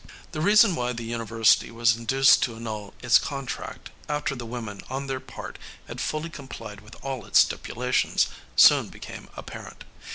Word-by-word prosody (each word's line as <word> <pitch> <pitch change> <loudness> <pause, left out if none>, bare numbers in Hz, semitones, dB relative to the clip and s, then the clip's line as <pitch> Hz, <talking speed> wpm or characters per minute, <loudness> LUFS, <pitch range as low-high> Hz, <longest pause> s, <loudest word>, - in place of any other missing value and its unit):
The 155 - -4
reason 205 +1 +5
why 125 -3 -1
the 115 -1 -6
university 115 -1 +2
was 115 -1 +2
induced 135 +4 +4
to 115 - -1
annul 110 -3 -6
its 120 -2 +6
contract, 135 -2 -6 0.2
after 150 -1 -1
the 120 -2 -7
women 115 -4 -6
on 135 +2 -3
their 135 -1 -3
part - - -9 0.3
had - - -6
fully 155 +2 -3
complied 120 -8 -9
with 105 - -14
all 135 -4 -4
its 100 - +1
stipulations, 125 +1 +2 0.3
soon - - +7
became - - -10
apparent. - - -9
120 Hz, 160 wpm, -25 LUFS, 115-135 Hz, 0.3 s, soon